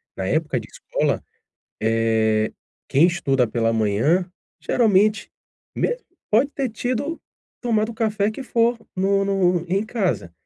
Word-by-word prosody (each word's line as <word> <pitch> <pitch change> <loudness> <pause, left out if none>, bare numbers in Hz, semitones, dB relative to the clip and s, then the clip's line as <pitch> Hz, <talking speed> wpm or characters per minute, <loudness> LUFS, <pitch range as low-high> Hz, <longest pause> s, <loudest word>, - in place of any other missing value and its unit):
na 95 - -3
época 150 +1 0
de - - -10
escola, - - -2 0.6
eh, 110 -1 +2 0.4
quem 150 +6 +5
estuda 135 -8 +1
pela 115 0 0
manhã, 115 - +2 0.3
geralmente 215 -2 +2 0.5
mesmo - - -1 0.3
pode 245 +7 +3
ter 275 -3 -2
tido 255 +8 -3 0.4
tomado 220 -1 0
café 215 -2 0
que 265 +5 -7
for 235 -1 +2 0.2
no 195 +1 +2
no 185 -3 +1
em 195 +4 +1
casa, 190 - -1
190 Hz, 125 wpm, -22 LUFS, -, 0.6 s, quem